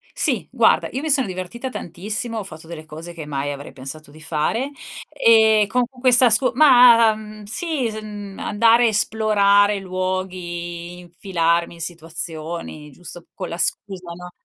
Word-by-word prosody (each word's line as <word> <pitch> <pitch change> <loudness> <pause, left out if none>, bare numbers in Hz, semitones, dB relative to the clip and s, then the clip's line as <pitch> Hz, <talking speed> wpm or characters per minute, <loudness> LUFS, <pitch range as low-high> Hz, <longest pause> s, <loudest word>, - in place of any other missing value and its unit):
Sì, - - 0
guarda, - - +3
io 265 - -4
mi 315 - -3
sono 270 -2 +3
divertita 185 +7 -6
tantissimo, 215 +4 -5
ho - - -5
fatto 160 -4 -11
delle 160 -2 -9
cose 160 +3 -10
che 165 -3 -8
mai 145 -1 -3
avrei 140 0 -8
pensato 140 +3 -10
di 155 - -15
fare, 170 - -2 0.4
ehm, 220 -6 +4
con 250 +4 +1
questa 250 -1 +3
scu 240 +4 +3
ma, 245 -5 +7
u - - -8
uhm, 215 0 -11
sì 285 - -2
s 215 0 -6
mhmm, 205 -2 -9
andare 230 +3 +3
a - - +5
esplorare 205 -1 +2
luoghi, 180 -2 -5
infilarmi 170 -1 -1
in 170 - -11
situazioni, 165 -2 -6
giusto 175 +3 -12
con - - -6
la 170 - -5
scusa, 180 -1 -2
no? 180 +1 -10
190 Hz, 160 wpm, -21 LUFS, 170-225 Hz, 0.4 s, ma